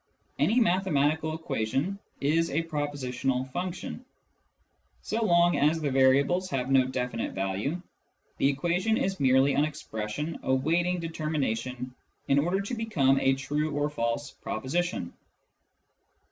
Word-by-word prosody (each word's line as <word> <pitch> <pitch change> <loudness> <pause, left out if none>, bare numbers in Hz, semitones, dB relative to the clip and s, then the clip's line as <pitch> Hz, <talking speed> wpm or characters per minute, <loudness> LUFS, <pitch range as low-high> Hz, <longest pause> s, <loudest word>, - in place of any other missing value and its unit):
Any 230 +4 +3
mathematical 160 - +2
equation 145 - -2 0.2
is 165 +4 +2
a 165 +4 0
propositional 135 -4 -2
function. 180 - -4 1.0
So 225 +1 -1
long 175 -4 +4
as 150 +3 +3
the 145 -3 -1
variables 140 +8 +3
have 135 -4 -2
no 135 -1 +5
definite 125 -3 -3
value, 95 - -2 0.6
the 135 - +4
equation 175 +9 +1
is 195 0 -1
merely 135 +1 +4
an 145 - +3
expression 150 0 -4
awaiting 165 +7 +1
determination 130 -6 -3 0.3
in 140 - +4
order 175 +6 +1
to 200 - -5
become 155 - +2
a 135 0 +3
true 145 +3 -2
or 145 +1 0
false 135 +1 -2
proposition. 160 - -3
145 Hz, 120 wpm, -28 LUFS, 130-175 Hz, 1.0 s, no